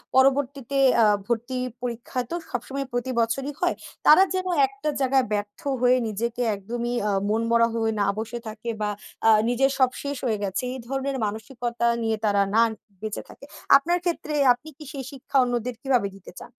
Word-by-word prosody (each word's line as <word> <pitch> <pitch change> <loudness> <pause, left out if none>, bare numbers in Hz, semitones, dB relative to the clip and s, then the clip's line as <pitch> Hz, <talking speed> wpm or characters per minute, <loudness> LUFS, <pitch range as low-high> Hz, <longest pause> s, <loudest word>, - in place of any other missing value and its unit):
পরবর্তীতে 275 0 +2 0.3
আ - - +6 0.2
ভর্তি 240 +2 -2 0.2
পরীক্ষা 240 +1 -4
তো - - -3
সবসময় 270 +3 -4
প্রতিবছরই 245 +3 -1
হয়। 355 0 +2 0.3
তারা 345 +5 +8
যেন 370 0 -1 0.2
একটা 275 +3 -4
জায়গায় 265 0 +3
ব্যর্থ 205 0 -3 0.2
হয়ে 250 +1 +5
নিজেকে 235 +3 -3
একদমই 235 +4 -4 0.2
আ - - +1 0.2
মনমরা 230 +1 +3
হয়ে 225 -1 0
না 200 - +2
বসে 225 +2 -4
থাকে 220 +2 -6
বা 210 - 0 0.4
আ - - +8 0.2
নিজের 270 +3 +2
সব 260 -2 +4
শেষ 285 0 -3
হয়ে 220 -4 +1
গেছে। 195 +4 -2
এই 260 - -6
ধরনের 270 0 -2
মানসিকতা 235 +3 -2 0.2
নিয়ে 225 -1 0
তারা 200 -1 +3
না 230 - +6 0.4
বেঁচে 215 -1 -4
থাকে। 280 - -13 0.3
আপনার 345 +6 0
ক্ষেত্রে 335 -3 -2 0.2
আপনি 250 +6 -12
কি 310 - -10
সেই 275 -4 -6
শিক্ষা 275 0 -3
অন্যদের 245 0 -2
কীভাবে 250 -7 +2
দিতে 195 - -13
চান? - - -12
245 Hz, 170 wpm, -25 LUFS, 225-270 Hz, 0.4 s, তারা